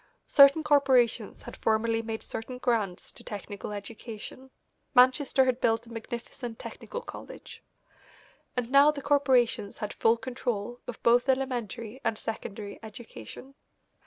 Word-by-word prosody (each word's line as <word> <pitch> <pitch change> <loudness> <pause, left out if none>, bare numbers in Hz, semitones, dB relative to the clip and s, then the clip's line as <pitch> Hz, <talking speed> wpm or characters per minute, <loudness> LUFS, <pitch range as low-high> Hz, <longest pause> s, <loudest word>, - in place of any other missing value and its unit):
Certain 280 +2 +7
corporations 260 -7 +3
had - - -9
formerly 225 +1 +1
made 225 -1 -5
certain 250 +3 -6
grants 220 -8 -1
to - - -11
technical 205 0 -7
education 220 +4 -8 0.5
Manchester 260 +1 +5
had 255 -1 0
built 225 0 +2
a 235 - -14
magnificent 235 0 -6
technical 485 - -7
college - - -10 1.0
and 245 0 -2
now 280 +2 +7
the 290 -2 -2
corporations 260 -7 +2
had 210 - -4
full 225 +1 +3
control 245 -2 -4
of 245 - -8
both 240 +3 +4
elementary 250 -3 -2
and 220 - 0
secondary 210 -2 -6
education. 225 - -11
235 Hz, 130 wpm, -28 LUFS, 220-260 Hz, 1.0 s, Certain